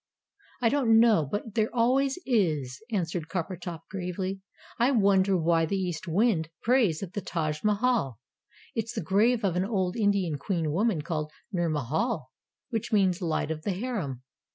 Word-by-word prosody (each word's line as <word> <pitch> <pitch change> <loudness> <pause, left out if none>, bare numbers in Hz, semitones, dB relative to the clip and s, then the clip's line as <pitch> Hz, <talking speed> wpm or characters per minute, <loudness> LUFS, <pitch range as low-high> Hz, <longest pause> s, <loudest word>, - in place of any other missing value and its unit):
"I 230 - +5
don't 235 -5 +4
know, 215 - +4
but 210 +1 -3
there 220 -1 +1
always 265 +4 +2
is," 155 - 0
answered 170 -5 -2
Coppertop 175 -1 -4
gravely. 190 +1 -4 0.4
"I 240 +2 +4
wonder 195 -5 +3
why 165 -1 +2
the 195 - -1
East 180 -2 -3
Wind 170 -2 +2
prays 225 -9 +2
at 190 -1 -7
the 205 - -3
Taj 155 -4 -3
Mahal? 210 - +1 0.6
It's 225 0 -3
the - - -1
grave 220 +7 +2
of 180 -3 +1
an 180 - +1
old 190 -3 -1
Indian 200 -9 +1
Queen 165 -1 -1
woman 185 -2 +1
called 155 -2 -3 0.2
Nur 175 -4 0
Mahal 155 - -1 0.4
which 225 -3 -2
means 195 -3 +2
Light 160 -2 -1
of 155 -1 -4
the 195 - -1
Harem. 180 - -4
190 Hz, 160 wpm, -28 LUFS, 165-220 Hz, 0.6 s, I